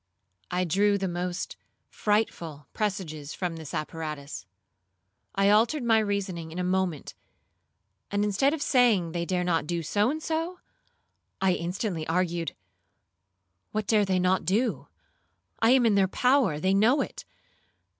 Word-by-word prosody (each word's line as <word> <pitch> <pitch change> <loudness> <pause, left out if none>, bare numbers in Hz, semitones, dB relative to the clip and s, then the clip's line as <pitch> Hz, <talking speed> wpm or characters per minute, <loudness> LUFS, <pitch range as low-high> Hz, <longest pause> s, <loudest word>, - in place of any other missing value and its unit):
I 180 +1 0
drew 200 +4 +2
the 195 -1 -2
most 175 +1 -3 0.3
frightful 170 -8 -1
presages 175 -9 -3
from 180 -3 -3
this 160 -3 -8
apparatus. 150 - -5 0.9
I 195 0 +4
altered 235 +7 +3
my 225 -2 +4
reasoning 195 -6 -2
in 165 - -8
a 180 - -1
moment, 180 -4 -1 1.0
and 205 0 0
instead 210 +7 +2
of 305 -1 -2
saying 225 - +3
they 170 0 -2
dare 180 -1 0
not 165 -4 0
do 170 -1 -2
so 205 +8 +1
and 310 +3 -2
so, 330 +3 -2 0.8
I 190 -1 +3
instantly 175 -1 -3
argued 170 -1 -1 1.2
'What 215 0 -1
dare 210 0 +3
they 190 -2 +1
not 185 +1 +2
do? 210 +9 0 0.7
I 225 - +4
am 255 -1 +5
in 225 - +4
their 195 -1 +4
power,—they 195 - +2
know 225 +8 +4
it. - - -5
190 Hz, 140 wpm, -27 LUFS, 170-215 Hz, 1.2 s, am